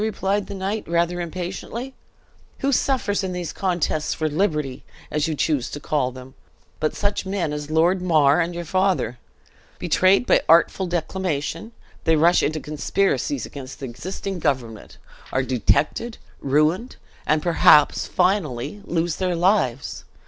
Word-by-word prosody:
replied 205 Hz, -2 st, -1 dB
the -, -, -6 dB
knight, 195 Hz, +3 st, -2 dB
rather 170 Hz, +1 st, 0 dB
impatiently. 185 Hz, +9 st, -5 dB, 0.7 s
"Who 275 Hz, -, +1 dB
suffers 245 Hz, -7 st, +1 dB
in 185 Hz, -1 st, -3 dB
these 180 Hz, -2 st, -4 dB
contests 175 Hz, -5 st, -1 dB
for 155 Hz, -, -1 dB
liberty, 150 Hz, -5 st, -1 dB, 0.3 s
as 150 Hz, 0 st, 0 dB
you 160 Hz, -, -2 dB
choose 145 Hz, -4 st, 0 dB
to 145 Hz, -, -6 dB
call 140 Hz, -4 st, 0 dB
them, 130 Hz, +1 st, -11 dB, 0.5 s
but 155 Hz, -, -1 dB
such 205 Hz, 0 st, -1 dB
men 190 Hz, -6 st, -2 dB
as 150 Hz, 0 st, -5 dB
Lord 170 Hz, +4 st, +2 dB
Mar 155 Hz, -3 st, +4 dB
and 170 Hz, +1 st, -2 dB
your 175 Hz, 0 st, -5 dB
father? 185 Hz, -, 0 dB, 0.6 s
Betrayed 185 Hz, +5 st, +3 dB
by -, -, +4 dB
artful 170 Hz, +3 st, +4 dB
declamation, 175 Hz, +2 st, -3 dB, 0.3 s
they 160 Hz, -, +4 dB
rush 170 Hz, +3 st, +4 dB
into 155 Hz, +1 st, 0 dB
conspiracies 195 Hz, -, -1 dB
against 135 Hz, -1 st, -9 dB
the 140 Hz, -, -5 dB
existing 185 Hz, +9 st, -5 dB
government, 120 Hz, -8 st, -3 dB, 0.3 s
are 130 Hz, -, +1 dB
detected, 130 Hz, -, 0 dB, 0.2 s
ruined, 155 Hz, -, +1 dB, 0.3 s
and 155 Hz, 0 st, +2 dB
perhaps 155 Hz, -3 st, +5 dB
finally 180 Hz, -, 0 dB
lose 170 Hz, -1 st, -1 dB
their 185 Hz, -2 st, 0 dB
lives! 170 Hz, -, +1 dB
170 Hz, 140 wpm, -23 LUFS, 150-190 Hz, 0.7 s, perhaps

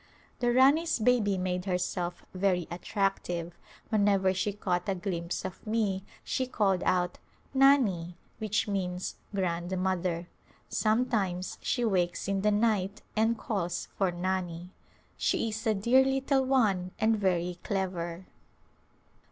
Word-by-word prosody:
The 240 Hz, -1 st, +2 dB
Rani's 280 Hz, +7 st, +4 dB
baby 220 Hz, -4 st, +2 dB
made 180 Hz, 0 st, -2 dB
herself 180 Hz, -1 st, -2 dB
very 185 Hz, -2 st, +1 dB
attractive; 175 Hz, -2 st, -2 dB, 0.3 s
whenever 200 Hz, -3 st, +3 dB
she 190 Hz, +2 st, 0 dB
caught 180 Hz, -2 st, -2 dB
a 195 Hz, -, +1 dB
glimpse 175 Hz, -2 st, -3 dB
of 190 Hz, +4 st, -7 dB
me 210 Hz, -4 st, 0 dB, 0.2 s
she 260 Hz, -, -1 dB
called 195 Hz, -7 st, +1 dB
out 180 Hz, -1 st, +1 dB, 0.2 s
" -, -, -34 dB
Nani 190 Hz, -12 st, +4 dB
" -, -, -36 dB
which 215 Hz, -1 st, 0 dB
means 185 Hz, -3 st, -2 dB, 0.2 s
"grandmother." 180 Hz, -1 st, -1 dB, 0.4 s
Sometimes 215 Hz, -5 st, 0 dB
she 245 Hz, -3 st, 0 dB
wakes 180 Hz, -5 st, 0 dB
in 195 Hz, 0 st, 0 dB
the 210 Hz, -, +3 dB
night 205 Hz, -2 st, +1 dB
and 225 Hz, +1 st, +2 dB
calls 175 Hz, -6 st, -3 dB
for 190 Hz, -2 st, +1 dB
Nani. 180 Hz, -1 st, -3 dB, 0.5 s
She 225 Hz, -, +1 dB
is 220 Hz, +1 st, -4 dB
a 220 Hz, -, +3 dB
dear 235 Hz, +7 st, +4 dB
little 270 Hz, 0 st, +1 dB
one 210 Hz, -9 st, +2 dB
and 220 Hz, +1 st, +3 dB
very 180 Hz, -3 st, 0 dB
clever. 180 Hz, -2 st, -3 dB
195 Hz, 130 wpm, -29 LUFS, 180-220 Hz, 0.5 s, Rani's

